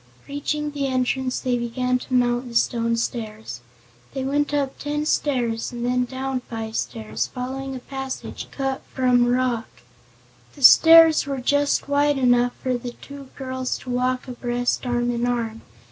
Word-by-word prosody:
Reaching 295 +1 -3
the 285 -1 -2
entrance 255 0 0
they 245 -1 0
began 250 +2 -1
to 255 - -8
mount 245 0 +1
the 235 - -10
stone 230 0 +1
stairs. 220 - -4 0.6
They 265 - -2
went 290 +2 0
up 280 -2 -1
ten 295 +1 -2
stairs 245 -7 0
and 240 -1 -4
then 250 0 +1
down 265 +1 -3
five 225 -1 -5
stairs, 220 -2 -3
following 265 +1 -5
a - - -5
passage 270 0 -6
cut 270 -1 -3
from 250 -2 +3
the - - +1
rock. 245 -2 0 0.9
The 280 - -9
stairs 325 +2 +8
were 275 -1 -2
just 285 +3 +1
wide 285 0 +2
enough 245 -1 +3
for 255 -2 0
the 240 0 -6
two 280 0 -11
girls 260 -1 -3
to 255 - -6
walk 255 +1 -1
abreast, 245 0 -2
arm 240 0 0
in 240 0 -1
arm. 230 -2 -2
255 Hz, 160 wpm, -23 LUFS, 240-270 Hz, 0.9 s, stairs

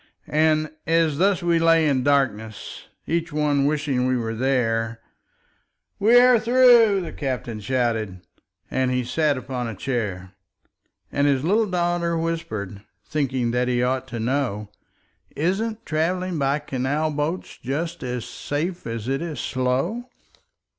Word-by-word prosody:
And 155 0 +2 0.2
as 165 -2 +2
thus 190 0 +2
we 170 -1 +3
lay 165 -1 +4
in 135 -3 +2
darkness, 120 -7 -1 0.2
Each 165 0 -1
one 145 -2 +1
wishing 145 -4 0
we 130 0 +1
were 115 -1 -2
there, 115 -2 0 1.0
"We 225 +4 +6
are 250 -1 +6
through!" 235 -4 +5
the 170 - -6
captain 125 -5 -4
shouted, 110 -5 -1 0.5
And 130 -1 +1
he 125 0 0
sat 145 +3 +1
upon 125 -1 -4
a 115 - -5
chair. 95 -6 -3 0.8
And 145 +1 +2
his 135 -2 +2
little 210 +6 +2
daughter 175 -1 0
whispered, 110 - -3 0.2
Thinking 130 -6 -1
that 125 +1 0
he 125 -1 +1
ought 130 +1 -1
to 120 -2 -5
know, 115 -4 -1 0.6
"Isn't 215 +8 -1
travelling 175 +2 -1
by 140 +1 +2
canal 145 +2 -1
boats 150 +5 -3
Just 165 +6 -3
as 125 -2 -4
safe 170 +4 -4
as 115 0 -4
it 135 +2 -1
is 160 -6 -4
slow?" 135 - -1
140 Hz, 140 wpm, -23 LUFS, 125-165 Hz, 1.0 s, We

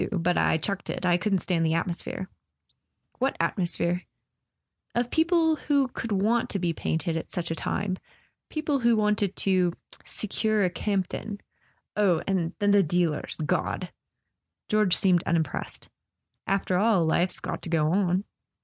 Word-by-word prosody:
But 180 -3 +1
I - - +3
chucked 195 +5 -3
it. - - -3
I 175 -1 +4
couldn't 190 -1 0
stand 170 -3 +1
the 160 0 +2
at¬ 165 - +1
mosphere." 180 +1 -4 0.5
" - - -43
What 265 +2 0
atmosphere? 175 -1 0 0.4
" - - -42
"Of 240 0 0
people 325 -1 +3
who 280 -3 +1
could 230 -2 -5
want 215 +4 +2
to - - 0
be 175 -3 0
painted 160 +1 -2
at 165 - -4
such 170 -2 -3
a - - -1
time. 185 +2 -2 0.5
People 305 -2 -1
who 235 -1 +4
wanted 210 -2 +1
to 185 -3 +2 0.3
'secure 215 0 0
a 180 - 0
Campton.' 200 +2 -2 0.6
Oh, 190 -6 +2
and 180 -4 0
then 205 -1 +2
the 200 0 +6
dealers—God! 160 -3 -1 0.4
" - - -59
George 210 -4 +4
seemed 180 -3 +4
unimpressed. 160 -4 -2 0.6
"After 195 -2 +1
all, 205 -5 +3
life's 175 +3 +1
got - - -4
to - - -7
go 155 -2 +2
on." 185 0 +2
190 Hz, 160 wpm, -27 LUFS, 170-215 Hz, 0.6 s, the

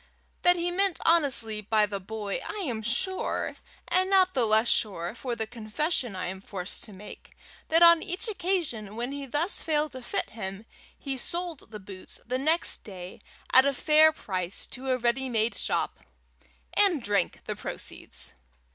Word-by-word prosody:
That 355 0 +6
he 350 0 -1
meant 385 0 +1
honestly 260 -10 +3
by 215 0 +3
the 200 -1 -4
boy 205 +1 -4
I 420 -2 -4
am 225 -4 -2
sure, 370 - -1 0.3
and 370 +1 +2
not 375 -1 +5
the 250 -4 +2
less 220 +2 +4
sure 190 -6 +1
for 245 0 -4
the 220 0 -2
confession 235 - -2
I 185 - -3
am 190 +1 -5
forced 190 -2 -5
to 215 - -11
make, 205 +2 -11 0.3
that 330 +2 +5
on 335 -1 +8
each 375 +4 -3
occasion 335 - -1
when 240 +3 -3
he 280 -1 -5
thus 305 +9 +1
failed 305 -2 0
to 260 - -8
fit 385 +10 -2
him, 195 -1 -6 0.3
he 270 -2 -4
sold 340 -1 -3
the 210 -1 -8
boots 190 -1 -6
the 255 +2 -1
next 315 +5 +2
day 185 -3 -9 0.3
at 260 - +9
a 280 0 +2
fair 310 +3 +6
price 185 - -4
to 265 +1 -5
a 255 - +3
ready 255 +2 0
made 225 -1 +1
shop, - - -1 0.8
and 360 - +4
drank 200 -4 0
the - - -3
proceeds. - - -5
250 Hz, 175 wpm, -28 LUFS, 210-330 Hz, 0.8 s, at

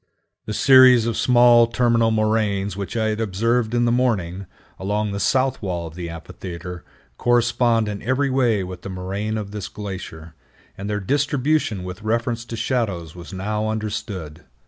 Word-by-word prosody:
The 105 - -3
series 130 -3 +7
of 115 -1 -1
small 120 -1 +5
terminal 115 -1 +2
moraines 110 -3 0
which 100 +3 -5
I 110 -1 +1
had 110 +1 -2
observed 115 +3 0
in 120 0 +2
the 120 - +2
morning, 100 -7 0 0.3
along 105 +2 -1
the 100 - -3
south 130 +3 +1
wall 90 -4 -3
of 80 - -8
the 85 0 -6
amphitheater, 85 +1 -8 0.4
correspond 120 -2 +2
in 105 -1 -4
every 130 +3 0
way 120 -7 +2
with 90 -1 -8
the - - -7
moraine 95 +4 -3
of 100 -2 -5
this 105 -2 -5
glacier, 90 -6 -8 0.4
and 100 +1 -6
their 105 0 -1
distribution 140 -2 0
with 90 +2 -7
reference 115 +1 -1
to 115 - -6
shadows 105 - -2
was 85 +1 -10
now 105 +3 -2
understood. 100 -7 -5
110 Hz, 165 wpm, -22 LUFS, 95-120 Hz, 0.4 s, series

